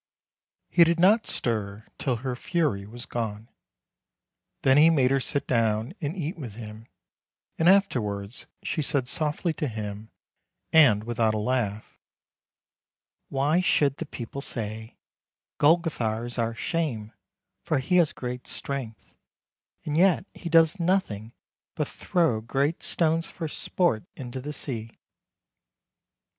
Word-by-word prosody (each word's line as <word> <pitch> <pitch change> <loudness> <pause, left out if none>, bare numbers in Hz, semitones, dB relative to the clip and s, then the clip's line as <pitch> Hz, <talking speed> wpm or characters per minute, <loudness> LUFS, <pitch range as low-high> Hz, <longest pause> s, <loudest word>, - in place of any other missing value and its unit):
" - - -59
He 170 - +10
did 170 0 +2
not 210 +6 +5
stir 110 -2 -2
till 130 -3 0
her 130 -1 -1
fury 120 - -1
was 120 +3 -7
gone. 110 -1 -4 1.1
Then 135 0 +5
he 155 +2 +8
made 135 -6 +3
her 135 - +3
sit 140 +2 -2
down 115 +2 +1
and 155 +4 -3
eat 165 +1 -4
with 120 -8 -7
him, 110 0 -9 0.7
and 165 +2 +5
afterwards 110 - +1 0.2
she 155 - -1
said 140 -3 0
softly 155 +5 0
to 150 - -2
him, 105 -2 -6 0.6
and 125 -10 +6
without 115 -1 +1
a - - 0
laugh: 110 -2 -2 0.6
" - - -67
Why 145 +5 +2
should 145 -6 +2
the 165 - -5
people 130 +2 -6
say, 110 -3 -4 0.3
* - - -67
Golgothar 145 -8 +2
is 120 0 -4
our 115 0 0
shame, 120 -7 -2 0.5
for - - +1
he 135 +7 +1
has 170 -4 +4
great 125 0 -6
strength, 125 -7 -6 0.7
and 150 - -2
yet 180 +2 +4
he 170 - -7
does 165 +2 +5
nothing 165 - 0 0.4
but - - -1
throw 160 -11 0
great 140 +7 -1
stones 165 0 +1
for 165 - -5
sport 155 - 0
into 130 0 -6
the 145 +3 -5
sea' 115 -6 -5
130 Hz, 140 wpm, -26 LUFS, 110-160 Hz, 1.1 s, He